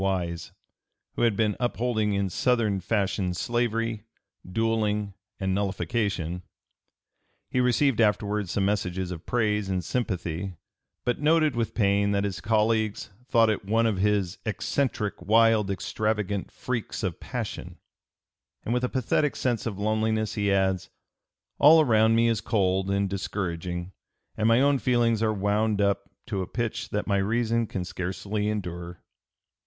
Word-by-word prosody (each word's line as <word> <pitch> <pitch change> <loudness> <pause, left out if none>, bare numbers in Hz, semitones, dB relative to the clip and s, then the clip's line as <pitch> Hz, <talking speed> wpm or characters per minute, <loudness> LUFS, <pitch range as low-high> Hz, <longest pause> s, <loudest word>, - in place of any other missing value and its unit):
Wise, 90 -3 -2 0.6
who - - -4
had 115 -3 +3
been 105 -2 +1
upholding 120 -3 0
in 100 -1 0
Southern 115 -5 +1
fashion 95 -2 -1
slavery, 115 0 -1 0.5
duelling, 105 -1 0 0.3
and 95 -1 0
nullification. 100 -3 -1 1.1
He 125 - +1
received 125 0 +3
afterward 105 -2 +1
some 95 +2 0
messages 95 -3 -1
of 85 -2 -8
praise 105 -4 0
and 90 -2 -1
sympathy, 90 -5 -3 0.5
but 120 - 0
noted 155 -2 +3
with 115 -1 -2
pain 100 -1 +2
that 100 0 +1
his 95 -6 -3
colleagues 110 +1 +1 0.2
thought 115 -2 +4
it 105 - -3
one 115 +4 +2
of 110 -4 +1
his 100 -2 0
"eccentric, 110 -1 -2
wild, 110 +1 +4
extravagant 105 0 -2
freaks 125 -3 -4
of - - -2
passion;" - - -5 0.9
and 115 - -1
with 125 0 0
a 125 - +1
pathetic 135 +3 0
sense 120 -4 -1
of 105 -4 -4
loneliness 110 +1 0
he 100 -1 0
adds: 95 -2 +1 0.7
"All 155 +3 +8
around 110 -6 +4
me 115 +1 +4
is 115 -2 +1
cold 95 -4 +1
and 100 0 +1
discouraging 90 -2 -4 0.4
and 110 - +1
my 115 +2 +5
own 140 -1 +3
feelings 120 -3 +2
are 110 -1 +2
wound 105 +1 +1
up 100 -1 +1 0.2
to 95 - -2
a 90 - -4
pitch 120 -2 -3
that 105 - -2
my 100 -2 +1
reason 115 +3 +1
can 90 -3 -4
scarcely 95 +4 -4
(p. - - 0
298) - - +1
endure." 90 -4 -5
105 Hz, 150 wpm, -26 LUFS, 95-115 Hz, 1.1 s, All